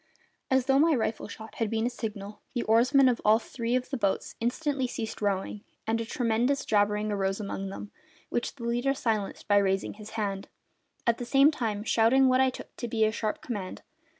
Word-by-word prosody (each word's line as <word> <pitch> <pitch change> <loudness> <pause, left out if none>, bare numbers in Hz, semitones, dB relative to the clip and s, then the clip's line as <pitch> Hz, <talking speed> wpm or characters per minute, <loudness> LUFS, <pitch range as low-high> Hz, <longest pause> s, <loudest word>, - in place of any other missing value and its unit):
As 260 -2 +3
though 270 0 +4
my 320 0 +4
rifle 220 -2 -2
shot 220 +1 -10
had 225 -2 0
been 225 +1 0
a - - +2
signal, 210 -3 -6
the 240 - 0
oarsmen 250 +5 +5
of 245 -2 +1
all 215 +1 +6
three 235 +1 -3
of 255 0 -2
the 270 - -1
boats 200 -4 -1
instantly 265 +2 -1
ceased 225 -2 -5
rowing, 205 +1 -1 0.2
and 225 +1 0
a - - -3
tremendous 245 +3 0
jabbering 210 0 +1
arose 195 -1 -1
among 195 -1 -4
them, 205 +1 -8 0.4
which 240 - -2
the 250 - -10
leader 240 +4 0
silenced 220 -6 -2
by 205 -1 +4
raising 195 -1 +1
his 210 0 -11
hand, 200 -2 -2 0.6
at 235 -1 +2
the - - -3
same 275 +4 +5
time 220 -8 -2
shouting 235 +4 +4
what 255 0 +4
I 265 - +4
took 255 - -10
to 240 - -4
be 220 -1 +2
a 215 - +1
sharp 215 -1 -3
command. 205 -7 -5
225 Hz, 205 wpm, -28 LUFS, 210-255 Hz, 0.6 s, all